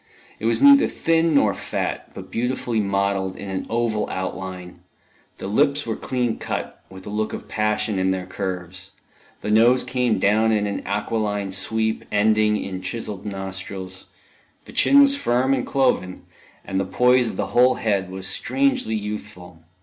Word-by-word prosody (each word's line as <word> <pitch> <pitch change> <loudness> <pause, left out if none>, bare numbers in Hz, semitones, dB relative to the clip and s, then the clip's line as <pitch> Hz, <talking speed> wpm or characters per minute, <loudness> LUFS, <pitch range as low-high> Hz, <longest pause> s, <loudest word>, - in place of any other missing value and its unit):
It 110 - -1
was 115 - +2
neither 280 0 +8
thin 165 -1 +1
nor 110 -8 +4
fat, - - -4
but - - -9
beautifully 120 -1 -1
modelled 100 -1 0
in 100 -1 -7
an 95 - -4
oval 115 -2 0
outline: 95 -1 -5 0.6
the - - -7
lips 140 +8 +2
were 115 -2 -2
clean 125 -3 -2
cut, - - -5
with 95 0 -12
a - - -6
look 110 +1 -2
of - - -7
passion 105 -1 0
in 95 0 +1
their 95 -1 -1
curves; 95 0 -5 0.5
the 105 - -2
nose 120 +4 +5
came 125 -3 0
down 110 +4 +3
in 105 -1 +1
an 100 -1 -3
aquiline 105 -1 -2
sweep, 110 +3 +1
ending 105 0 +3
in 95 -2 -5
chiselled 105 -1 -5
nostrils; 95 -1 -6 0.6
the - - -13
chin 280 0 +6
was 275 0 +3
firm 130 - +1
and 130 -2 -1
cloven, 125 -9 0 0.4
and 95 - -2
the - - +1
poise 125 +5 +3
of - - -5
the - - -2
whole 125 +1 +5
head 100 -4 -1
was 95 0 -7
strangely 265 - 0
youthful. 105 -5 -7
105 Hz, 165 wpm, -22 LUFS, 95-120 Hz, 0.6 s, neither